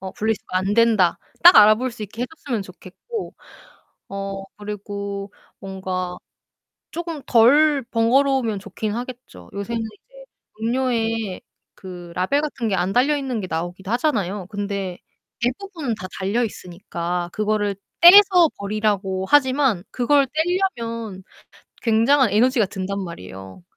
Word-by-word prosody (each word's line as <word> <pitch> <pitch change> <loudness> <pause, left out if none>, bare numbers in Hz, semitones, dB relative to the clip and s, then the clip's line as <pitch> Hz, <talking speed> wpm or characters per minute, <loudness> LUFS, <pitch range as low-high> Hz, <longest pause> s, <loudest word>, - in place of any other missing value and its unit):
어 190 0 -7
분리수거 215 -4 -2
안된다.' 205 -1 +3 0.2
딱 350 +1 +9
알아볼 215 +5 +6
수 225 -2 -9
있게 225 +4 -6
해 - - -1
줬으면 235 -9 -3
좋겠고, 195 - -8 0.7
어 195 0 -5
그리고 200 -1 -6 0.3
뭔가 185 -2 -4 0.8
조금 335 -4 -5
덜 275 +4 +5
번거로우면 245 -1 +2
좋긴 205 +1 -5
하겠죠. 240 - -8
요새는 225 +3 -3
이제 - - -12 0.4
음료에 225 -4 -1 0.3
그 175 -2 -10
라벨 235 +11 +1
같은 265 -7 -3
게 200 - 0
안 185 +2 0
달려 275 +6 +3
있는 260 -5 -3
게 190 - -5
나오기도 175 +4 -4
하잖아요. 210 - -1
근데 200 -3 -4 0.4
대부분은 285 - -2
다 185 - -7
달려 200 +6 0
있으니까 175 -3 -5
그거를 210 -1 0 0.3
떼서 360 -2 +8
버리라고 200 -2 -1
하지만 260 -8 +3
그걸 275 +3 +2
떼려면 235 - -2 0.6
굉장한 235 +2 +3
에너지가 230 +1 +3
든단 195 +1 -4
말이에요. 95 - -10
215 Hz, 285 characters per minute, -22 LUFS, 190-255 Hz, 0.8 s, 딱